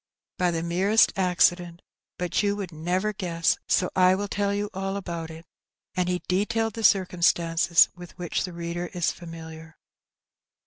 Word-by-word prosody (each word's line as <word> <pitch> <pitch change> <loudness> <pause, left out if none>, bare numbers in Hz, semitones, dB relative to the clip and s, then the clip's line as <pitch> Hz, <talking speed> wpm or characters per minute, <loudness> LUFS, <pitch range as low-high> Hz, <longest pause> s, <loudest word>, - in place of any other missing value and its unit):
''By 180 -1 +2
the 165 -1 -2
merest 190 +6 +3
accident. 175 -2 +1 0.3
Bat 180 -2 -3
yoa 200 +3 +1
woald 195 -4 -5
never 180 +6 -1
gness, 170 -4 0
so 180 - +1
I 185 0 +5
will 205 +1 -3
tell 200 0 -1
yoa 205 +1 -1
all 195 +1 -3
about 170 -4 -5
it.'' 160 +1 -11 0.5
And 180 -1 0
he 180 0 -2
detailed 225 +4 0
the 225 - -6
cir 195 -3 +5
cumstances 170 -1 +3
with 175 -1 -12
which 175 -2 -2
the 180 - -5
reader 170 +1 -4
is 175 -2 0
&miliar. 160 -2 -10
180 Hz, 165 wpm, -25 LUFS, 170-195 Hz, 0.5 s, I